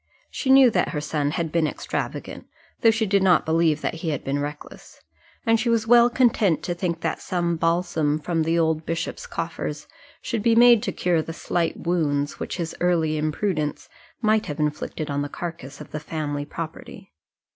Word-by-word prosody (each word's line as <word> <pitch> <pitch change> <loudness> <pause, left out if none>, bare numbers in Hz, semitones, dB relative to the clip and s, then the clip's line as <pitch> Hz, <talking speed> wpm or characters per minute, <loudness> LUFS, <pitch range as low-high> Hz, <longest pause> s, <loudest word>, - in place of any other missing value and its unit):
She 265 - -3
knew 265 -2 +7
that 180 -4 +1
her 150 - -3
son 150 -1 -1
had 160 +1 -2
been 165 -1 +2
extravagant, - - -5 0.3
though 225 - +6
she 220 0 +2
did 200 -1 +2
not 185 -2 +4
believe 160 -1 +2
that - - -2
he 170 - -2
had 145 -4 -3
been 140 +1 -1
reckless; 145 +1 -8 0.5
and 225 0 +3
she 240 - 0
was 230 -1 +2
well 240 +1 +6
content 230 - +2
to 175 - -2
think 170 -2 -3
that 160 - -2
some 175 -2 -1
balsam 165 -2 +1
from 165 +2 -1
the 165 +1 +1
old 160 -1 +1
bishop's 165 +1 -4
coffers 165 -3 -4 0.3
should 220 - -3
be 230 +1 +3
made 240 -1 +7
to 240 - -2
cure 175 -3 +1
the 165 - -7
slight 170 0 -1
wounds 145 -5 -1
which - - -4
his 165 -2 -4
early 165 -3 +2
imprudence 155 0 -2 0.3
might 215 0 +2
have 150 0 -5
inflicted 150 0 -2
on 140 0 -1
the 145 - -3
carcase 160 -5 -7
of 150 - -11
the 150 - -4
family 145 -2 -4
property. 155 - -8
165 Hz, 190 wpm, -24 LUFS, 150-190 Hz, 0.5 s, knew